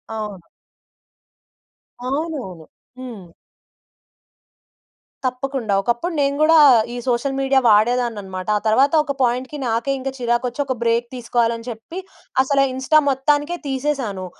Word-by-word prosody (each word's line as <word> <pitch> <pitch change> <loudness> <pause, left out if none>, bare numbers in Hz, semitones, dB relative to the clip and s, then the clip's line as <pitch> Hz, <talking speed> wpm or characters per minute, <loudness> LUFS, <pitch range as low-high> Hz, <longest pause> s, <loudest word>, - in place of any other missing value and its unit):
అవును. 205 -6 -6 1.6
అవునవును. 265 - -4 0.3
హ్మ్. 240 -7 -8 2.0
తప్పకుండా. 255 -3 -2
ఒకప్పుడు 240 - -1
నేను 280 0 +1
గూడా 320 +1 +6 0.4
ఈ - - -5
సోషల్ 255 +3 0
మీడియా 270 0 +3
వాడేదాన్ని 230 +1 +3
అన్నమాట. 185 -1 -7
ఆ - - -4
తర్వాత 265 +7 +3
ఒక 280 - -3
పాయింట్‌కి 255 +4 -1
నాకే 230 +4 0 0.2
చిరాకొచ్చి 240 +1 -1
ఒక 265 - -1
బ్రేక్ 235 +1 +1
తీసుకోవాలి 235 -1 0
అని 230 +1 -12
చెప్పి 230 +9 -8 0.4
అసల 275 +1 +2
ఇన్‌‌స్టా 265 +4 +2
మొత్తానికే 290 +5 +1
తీసేసాను. 265 -8 -2
250 Hz, 115 wpm, -20 LUFS, 230-275 Hz, 2.0 s, గూడా